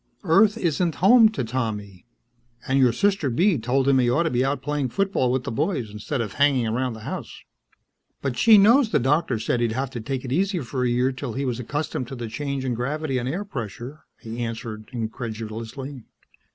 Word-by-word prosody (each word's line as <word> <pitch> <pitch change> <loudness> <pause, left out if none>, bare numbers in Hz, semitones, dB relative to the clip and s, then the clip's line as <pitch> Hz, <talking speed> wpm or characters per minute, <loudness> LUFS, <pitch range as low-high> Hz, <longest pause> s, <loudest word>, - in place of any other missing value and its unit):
"Earth 200 +5 +4
isn't 170 -3 0
home 225 +4 +6
to 215 -11 -3
Tommy. 110 -4 -4 0.6
And 135 +1 +2
your 125 -2 +5
sister 190 - +1
Bee 170 - +2
told 130 +4 0
him 135 -1 +4
he 120 -1 +3
ought 125 +8 +2
to 165 - -1
be 125 +1 +1
out 135 0 -1
playing 145 -3 -1
football 190 -6 0
with 130 0 0
the - - -4
boys 120 - -1
instead 105 +6 -3
of 105 -4 -4
hanging 140 -4 +3
around 125 +3 -1
the 110 - -10
house." - - -7 0.8
"But 135 -3 -3
she 220 - +7
knows 230 +5 +5
the - - +2
doctor 140 0 +1
said 120 +2 -1
he'd 115 -2 0
have 130 +2 -2
to 120 -3 -5
take 130 +3 -4
it 125 - -5
easy 190 +4 +1
for 125 0 -3
a 125 - +2
year 125 +2 +2
till 125 -3 -5
he 140 +3 -2
was 125 -2 -2
accustomed 130 0 -3
to 135 - -7
the 120 -2 -5
change 140 +3 -3
in 125 - 0
gravity 135 +3 -2
and 125 +1 -3
air 185 +8 -3
pressure," 125 - -7
he 115 +1 -7
answered 115 -2 -5
incredulously. 115 +2 -6
130 Hz, 205 wpm, -24 LUFS, 120-150 Hz, 0.8 s, she